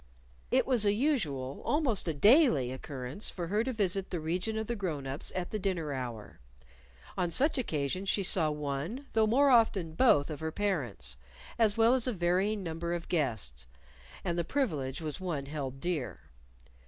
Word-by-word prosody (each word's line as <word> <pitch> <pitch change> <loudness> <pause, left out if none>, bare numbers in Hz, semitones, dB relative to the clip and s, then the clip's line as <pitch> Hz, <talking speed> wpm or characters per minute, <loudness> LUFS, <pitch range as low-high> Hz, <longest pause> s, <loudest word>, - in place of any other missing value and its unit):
It - - +3
was 250 -5 +2
a 205 -1 +4
usual 170 - -1
almost 270 - +1
a 165 - 0
daily 205 - +5
occurrence 130 - -4
for 175 - -5
her 210 +3 +1
to 260 - -2
visit 195 -4 0
the 175 - -3
region 180 +8 -2
of 220 - -2
the 235 - -3
grown 165 -9 -3
ups 135 +2 -3
at 180 -1 -3
the 215 - -2
dinner 175 -7 -2
hour. 120 - -6 0.8
On 180 -1 +1
such 275 - +2
occasions 185 - -2
she 200 - +1
saw 175 -4 +5
one, 150 - -4
though 220 -1 +3
more 275 +5 +4
often 205 -9 +3
both, 160 - +4
of 150 - -6
her 160 0 -3
parents 130 - -2 0.4
as 220 -2 +3
well 230 +2 +5
as 260 -1 +1
a 250 - +1
varying 190 +3 0
number 170 0 -3
of 170 - -7
guests. 110 - -2 0.6
And 175 -2 -1
the - - +1
privilege 155 - -2
was 155 +2 -4
one 170 -7 -3
held 140 -2 -5
dear. 170 -4 -3
175 Hz, 180 wpm, -30 LUFS, 145-215 Hz, 0.8 s, daily